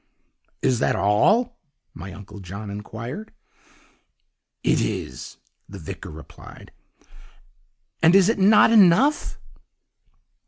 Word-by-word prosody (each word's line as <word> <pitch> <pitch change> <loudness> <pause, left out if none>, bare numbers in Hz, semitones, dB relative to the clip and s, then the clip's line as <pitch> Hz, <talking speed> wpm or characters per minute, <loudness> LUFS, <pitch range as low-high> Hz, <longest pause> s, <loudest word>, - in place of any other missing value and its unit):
"'Is 125 -3 +1
that - - +1
all?' 210 - +1 0.3
my 90 +4 -9
Uncle 100 +2 -12
John 100 +3 -8
inquired. 115 - -8 1.3
"'It - - +2
is,' 65 - -5 0.3
the - - -9
vicar - - -9
replied, 75 -2 -13 1.3
'and 165 +3 +5
is 195 -2 +5
it 225 -1 0
not 210 +3 +5
enough? 220 - +3
130 Hz, 95 wpm, -22 LUFS, -, 1.3 s, and